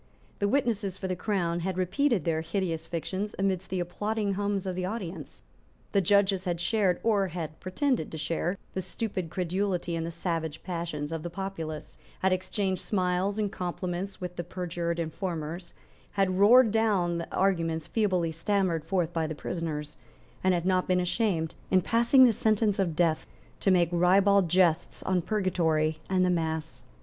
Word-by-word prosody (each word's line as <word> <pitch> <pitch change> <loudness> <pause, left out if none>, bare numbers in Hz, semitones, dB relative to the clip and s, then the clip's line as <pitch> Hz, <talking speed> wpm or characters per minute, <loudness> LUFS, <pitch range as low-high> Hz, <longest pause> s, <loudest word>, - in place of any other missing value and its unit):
The 200 - +2
witnesses 215 -6 0
for 190 - -4
the 185 - -1
Crown 175 -3 -1
had 185 +1 -2
repeated 200 - +1
their 160 -1 +1
hideous 165 -1 -2
fictions 190 +5 -3
amidst 190 -1 -1
the 185 - -1
applauding 205 +4 -1
hums 200 -1 -1
of 185 -1 -2
the 185 - -2
audience. 180 - -5 0.5
The 200 - +3
judges 195 0 +3
had 175 -2 -1
shared, 185 0 +1
or 205 -4 +3
had 160 -3 -6
pretended 230 - -1
to 160 - -5
share, 165 +4 -1 0.2
the 190 - -2
stupid 185 -1 -4
credulity 180 0 -1
and 165 - -2
the 165 - -3
savage 165 -2 -3
passions 165 -4 -4
of 165 -1 -3
the 175 - -5
populace, 165 -4 -6 0.2
had 190 0 +3
exchanged 185 0 -1
smiles 185 +1 0
and 210 -2 0
compliments 180 +1 -4
with 180 -1 -5
the 175 - -2
perjured 170 -1 -3
informers, 170 0 -4 0.4
had 190 -2 +1
roared 225 +3 +7
down 200 -6 +2
the 170 - -6
arguments 165 -4 +1
feebly 185 -7 +1
stammered 170 -1 0
forth 175 -3 -1
by 160 -1 0
the 155 - -4
prisoners, 150 -2 -4 0.5
and 185 -1 +4
had 175 0 -2
not 185 -1 +2
been 185 0 +3
ashamed, 180 -3 0 0.2
in 185 - +5
passing 235 +7 +5
the 235 - +4
sentence 215 -1 +2
of 175 -5 0
death, 165 -2 +1 0.3
to - - +1
make 175 -3 +4
ribald 190 +2 +4
jests 175 -2 +2
on 185 -1 +1
purgatory 165 -6 +1
and 185 -1 +3
the 180 - +2
mass. 160 -2 -2
180 Hz, 170 wpm, -28 LUFS, 170-195 Hz, 0.5 s, roared